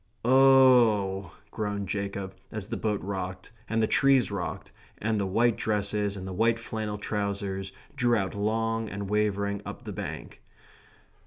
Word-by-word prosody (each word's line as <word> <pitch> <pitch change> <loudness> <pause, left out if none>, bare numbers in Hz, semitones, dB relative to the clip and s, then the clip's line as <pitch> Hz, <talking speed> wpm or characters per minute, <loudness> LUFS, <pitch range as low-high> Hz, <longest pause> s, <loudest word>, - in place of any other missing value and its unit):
"Oh 125 -7 +6
h 100 - -10
h - - -16
h," - - -34
groaned 100 -2 -3
Jacob, 100 0 -3 0.2
as 110 -3 -5
the - - -2
boat 105 -2 -1
rocked, 95 -1 -5 0.2
and 115 0 +1
the - - +3
trees 135 -5 +4
rocked, 100 -3 -4 0.3
and 110 0 0
the 100 - -1
white 115 +4 +2
dresses 105 -1 -1
and 95 0 -6
the 95 - -5
white 115 +4 +2
flannel 110 -2 -4
trousers 100 -2 -3 0.2
drew 120 -4 +3
out 95 -2 -2
long 115 +2 -1
and 100 0 -5
wavering 100 -1 0
up - - -8
the - - -6
bank. - - -7
105 Hz, 165 wpm, -28 LUFS, 100-115 Hz, 0.3 s, Oh